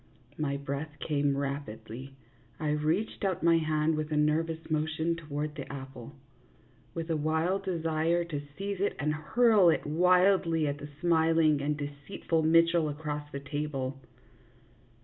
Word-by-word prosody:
My 140 -2 -1
breath 140 +2 -5
came 145 -2 0
rapidly; 135 -2 -5 0.4
I 155 -2 -1
reached 155 +10 -1
out 190 -3 -1
my 165 0 +5
hand 155 0 +1
with 155 0 -3
a 150 - +1
nervous 160 +2 +1
motion 160 +2 0
toward 150 -2 -4
the 145 -3 -7
apple, 130 -3 -9 0.8
with 165 0 -3
a - - +2
wild 160 +6 0
desire 165 -1 0
to 150 -4 -4 0.2
seize 200 -1 -3
it 200 - +1
and 150 +3 0
hurl 210 +4 +4
it - - +1
wildly 180 0 +3
at 145 0 -3
the 145 - -8
smiling 160 -3 +3
and 150 +1 -1
deceitful 145 +3 -3
Mitchell 165 0 +4
across 150 0 -5
the 140 - -5
table. 140 -2 -4
155 Hz, 145 wpm, -29 LUFS, 145-165 Hz, 0.8 s, my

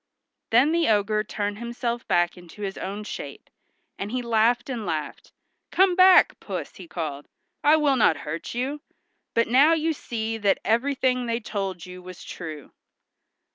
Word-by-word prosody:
Then 250 +7 +4
the 335 0 +2
ogre 210 0 +2
turned 205 0 -3
himself 235 0 -4
back 175 0 +2
into 180 +3 -11
his 195 -1 -3
own 200 +2 -5
shape, - - -8 0.5
and 200 +1 -4
he 250 0 -2
laughed 235 +1 +2
and 245 -5 -4
laughed. 155 -5 -4 0.4
"Come 375 -1 +3
back, 370 0 +6
Puss," - - -6
he - - -10
called, 150 - -5 0.4
"I 295 +2 +6
will 290 -4 +2
not 210 -8 +4
hurt 155 +8 -5
you; 270 +4 -2 0.5
but 230 - +3
now 275 +7 +5
you 325 0 +1
see 225 -5 -4
that 200 -2 +3
everything 255 +1 +1
they 230 0 0
told 195 -6 -4
you 180 0 -10
was 180 0 -11
true." 155 -4 -8
225 Hz, 160 wpm, -25 LUFS, 195-260 Hz, 0.5 s, back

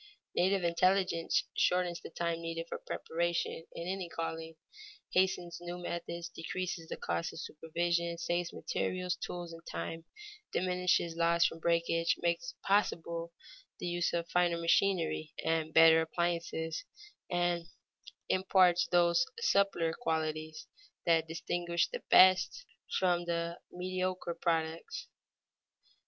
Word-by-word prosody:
Native 190 +1 +2
intelligence 175 0 +2
shortens 180 -1 +1
the - - -8
time 170 0 -2
needed 165 0 -4
for - - -5
preparation 170 0 -2
in 170 - -5
any 185 -2 -3
calling; 165 0 -4 0.6
hastens 180 -2 +1
new 175 0 -5
methods; 170 -1 -4
decreases 170 0 -4
the - - -4
cost 85 0 -2
of - - -8
supervision; 170 +2 -1
saves 175 0 -1
materials, 180 -1 -2
tools, 175 -2 -6
and 165 - -10
time; 165 0 -5 0.5
diminishes 180 -2 +1
loss 170 0 +3
from 165 - -1
breakage; 165 0 +2
makes 170 +9 -1
possible 170 -4 +1 0.5
the - - -6
use 175 0 0
of 170 0 -1
finer 175 -1 +2
machinery 170 -2 +1
and 160 -1 +1
better 160 0 +7
appliances, 165 -1 -2 0.5
and 175 -1 0 0.6
imparts 185 -2 +4
those 175 +5 +3
subtler 195 - +2
qualities 155 -5 -2 0.4
that 165 -1 +3
distinguish 170 +1 -1
the - - -6
best 185 - +6 0.3
from 175 -2 +2
the 170 0 -2
mediocre 185 -1 -2
products. 165 - -2
170 Hz, 115 wpm, -32 LUFS, 165-180 Hz, 0.6 s, better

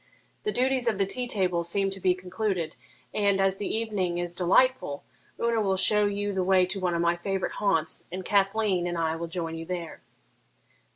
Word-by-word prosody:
The 425 - +1
duties 255 -3 +1
of 220 -4 +2
the 195 - +2
tea 245 +6 -3
table 180 -6 +1
seem 195 +3 0
to 195 - -5
be 185 -1 +2
concluded, 185 -2 -3 0.4
and, 200 -2 +2
as 195 0 +2
the 205 - -3
evening 205 -6 -1
is 175 0 -2
delightful, 180 - +2 0.4
Una 235 -1 +1
will 195 -2 +1
show 210 +2 +4
you 205 0 -2
the 190 -1 0
way 185 0 +4
to 190 +2 -3
one 180 -2 0
of 170 - 0
my 170 0 +3
favourite 190 +2 -2
haunts, 165 -6 +1
and 185 +1 -5
Cathleen 195 -2 +2
and 175 -1 -3
I 160 -1 0
will 170 +1 -4
join 165 -1 -4
you 165 0 -7
there.' 175 -3 -5
190 Hz, 195 wpm, -27 LUFS, 175-205 Hz, 0.4 s, show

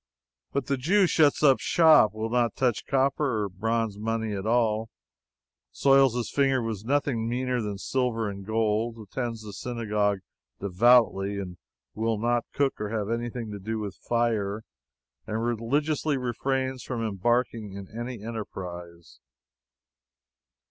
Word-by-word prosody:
But 140 - -1
the 140 - 0
Jew 190 +10 +3
shuts 155 -4 +3
up 135 -3 +6
shop; 155 - +5
will 110 +1 -3
not 120 -2 +1
touch 125 -5 0
copper 135 -4 +1
or 100 - -3
bronze 110 +2 -1
money 110 0 -2
at 100 +1 -4
all; 115 -1 +1 0.8
soils 135 - +4
his 120 -2 -2
fingers 135 -4 +2
with 110 -2 -4
nothing 130 -4 0
meaner 125 0 -1
than 105 -2 -4
silver 115 0 -1
and 100 -1 -6
gold; 110 +2 0
attends 115 +1 -5
the 105 -1 -8
synagogue 105 -3 -1 0.4
devoutly; 100 0 +3 0.5
will 110 0 -1
not 120 +2 0
cook 140 -5 0
or 105 - -2
have 110 -1 -2
anything 120 -1 -3
to 100 - -6
do 110 +3 -3
with 105 -3 -4
fire; 110 -3 -1 0.6
and 110 +1 -2
religiously 140 +6 0
refrains 130 +1 -2
from 120 -3 -3
embarking 110 +1 0
in 100 -1 -8
any 120 -2 -5
enterprise. 90 -6 -7
115 Hz, 135 wpm, -27 LUFS, 105-125 Hz, 0.8 s, up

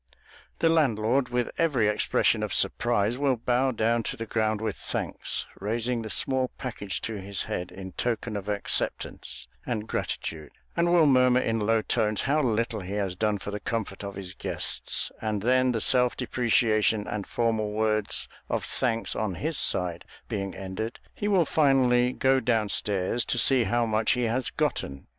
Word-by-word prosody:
The 165 - +2
landlord, 130 -5 +2
with 125 0 -1
every 140 -10 +2
expression 105 - +2
of - - -2
surprise, 120 0 +1
will 140 -2 +2
bow 125 +3 +1
down 115 -1 +1
to - - -5
the 115 - -4
ground 110 -1 0
with 110 -2 -2
thanks, - - -2
raising 115 +4 0
the 110 - -6
small 130 +3 +3
package 105 -6 -4
to 110 -3 -4
his 100 0 -2
head 90 0 -4
in 95 -1 -8
token 115 +1 -2
of 100 0 -5
acceptance 105 -1 -2 0.2
and 110 -3 -3
gratitude, 75 -2 -4 0.3
and 170 0 +2
will 170 -2 +5
murmur 125 -2 +5
in 115 -2 0
low 110 +1 +1
tones 110 -3 +1
how 145 +3 +1
little 115 -2 0
he 95 +1 -6
has 100 -3 -2
done 105 +1 0
for 100 - -7
the 105 - -4
comfort 105 -3 -4
of 100 0 -6
his 95 -1 -7
guests; - - 0
and 105 -2 -2
then, 130 +1 +3
the 115 - -1
self 125 +2 +4
depreciation 110 -4 +1
and 105 -2 -4
formal 110 -3 0
words 110 -1 +1 0.2
of - - -1
thanks 115 -3 -1
on 105 -4 -2
his 155 - -3
side 90 -1 -1 0.2
being 100 -2 -4
ended, 95 +5 -5
he 205 - -3
will 190 -5 +3
finally 130 -5 +3
go 130 +1 +2
down 115 -4 +1
stairs 100 +4 0
to - - 0
see 125 0 +4
how 120 0 +1
much 110 0 +1
he 125 - -1
has 120 +2 0
gotten. 70 0 -2
115 Hz, 175 wpm, -27 LUFS, 105-125 Hz, 0.3 s, will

